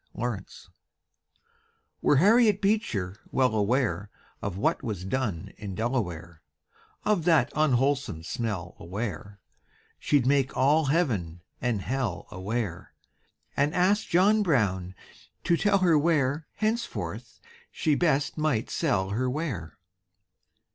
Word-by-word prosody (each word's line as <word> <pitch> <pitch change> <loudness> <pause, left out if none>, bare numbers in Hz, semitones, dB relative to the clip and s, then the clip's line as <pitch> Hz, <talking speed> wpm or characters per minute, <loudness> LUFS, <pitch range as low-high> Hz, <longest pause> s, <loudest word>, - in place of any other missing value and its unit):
TABB 115 -5 -3 1.5
Were - - +4
Harriet 210 - +5
Beecher 155 - 0
well 130 -3 +2
aware 110 -1 0 0.3
Of 100 -2 -4
what 100 - +1
was 100 -6 -4
done 100 -6 -2
in 100 -3 -6
Delaware, 90 - -3 0.6
Of 205 -5 +2
that 165 -3 +4
unwholesome 135 - +1
smell 95 -3 -4
aware, 100 +1 -5 0.6
She'd 145 -4 +2
make 135 0 +2
all 145 +4 +4
heaven 110 - 0 0.2
and 115 -5 -1
hell 120 -8 -2
aware, 100 -1 -4 0.6
And 145 +2 +1
ask 195 +4 +2
John 200 +5 +4
Brown 95 - 0 0.5
to 170 - +3
tell 200 +3 +3
her 175 -5 +4
where 150 -2 +1
Henceforth 220 +2 -3 0.3
she 155 - +1
best 145 -1 +1
might 150 -8 0
sell 100 - 0
her 125 +5 0
ware. 125 - -4
130 Hz, 115 wpm, -27 LUFS, 100-155 Hz, 1.5 s, Harriet